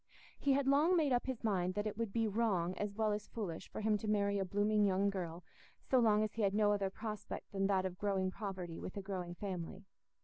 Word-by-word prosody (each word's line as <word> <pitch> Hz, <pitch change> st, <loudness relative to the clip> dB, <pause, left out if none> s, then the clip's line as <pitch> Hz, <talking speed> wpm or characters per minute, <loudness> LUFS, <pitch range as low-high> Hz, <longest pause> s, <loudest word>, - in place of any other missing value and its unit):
He 280 Hz, -, +3 dB
had 275 Hz, 0 st, +2 dB
long 305 Hz, +6 st, +5 dB
made 300 Hz, -4 st, +2 dB
up 245 Hz, -, +1 dB
his 260 Hz, -3 st, -3 dB
mind 185 Hz, -4 st, +1 dB
that 205 Hz, 0 st, -1 dB
it 215 Hz, -, -2 dB
would 225 Hz, -2 st, -2 dB
be 225 Hz, +1 st, +1 dB
wrong 195 Hz, -5 st, +1 dB
as 205 Hz, -1 st, -2 dB
well 220 Hz, 0 st, +1 dB
as 210 Hz, 0 st, -3 dB
foolish 195 Hz, -8 st, -5 dB
for -, -, -5 dB
him 210 Hz, -1 st, +2 dB
to 215 Hz, -, -5 dB
marry 200 Hz, -1 st, +2 dB
a 195 Hz, -, 0 dB
blooming 205 Hz, +2 st, +2 dB
young 200 Hz, 0 st, +3 dB
girl, 175 Hz, -3 st, -5 dB, 0.4 s
so 260 Hz, -, +3 dB
long 215 Hz, -2 st, +4 dB
as 215 Hz, -, -2 dB
he 225 Hz, -, -3 dB
had 200 Hz, -1 st, +2 dB
no 210 Hz, -1 st, +4 dB
other 200 Hz, -2 st, +1 dB
prospect 215 Hz, +1 st, -6 dB
than 195 Hz, -1 st, +1 dB
that 190 Hz, -2 st, +2 dB
of 180 Hz, 0 st, -4 dB
growing 195 Hz, -2 st, 0 dB
poverty 185 Hz, -5 st, -5 dB
with 185 Hz, -, -6 dB
a -, -, -2 dB
growing 180 Hz, -3 st, -4 dB
family. 190 Hz, 0 st, -5 dB
205 Hz, 240 wpm, -36 LUFS, 190-215 Hz, 0.4 s, long